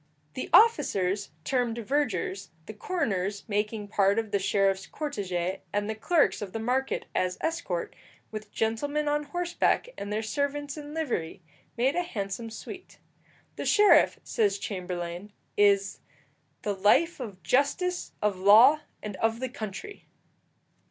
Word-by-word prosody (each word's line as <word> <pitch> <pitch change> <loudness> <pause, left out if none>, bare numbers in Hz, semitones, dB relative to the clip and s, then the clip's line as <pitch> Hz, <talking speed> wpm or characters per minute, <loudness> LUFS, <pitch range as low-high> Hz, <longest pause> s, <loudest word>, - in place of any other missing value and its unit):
The 255 - -5
officers 200 - +4
termed 245 -1 0
vergers, 225 -6 -1 0.2
the 215 - -8
coroners 205 - -2
making 210 0 -2
part 200 0 +3
of 225 -2 -1
the 200 - +2
sheriff's 195 0 +1
cortège, 190 - -3
and 205 0 -1
the 220 - -1
clerks 295 +8 +2
of 195 -3 -6
the 225 - -3
market 255 +4 -1
as 185 0 0
escort, 320 - -3 0.4
with 215 -1 -7
gentlemen 285 +7 -1
on 295 0 0
horseback 350 +9 0
and 200 +1 -5
their 215 +1 -1
servants 285 +5 -2
in 295 0 -8
livery, 215 - -3 0.3
made 260 +5 +2
a 355 - +2
handsome 225 - -4
suite. 365 - -10 0.6
The - - -4
sheriff, 415 -1 +5
says 415 -3 +1
Chamberlayne, 180 - -5 0.2
is 200 -1 +3 0.6
the 205 - 0
"life 220 - +3
of 200 -8 -7
justice, 285 - 0
of 205 -3 +1
law, 225 +10 +7 0.2
and 205 -3 -5
of 225 +2 0
the 260 0 -3
country." 230 - -7
220 Hz, 140 wpm, -28 LUFS, 195-290 Hz, 0.6 s, law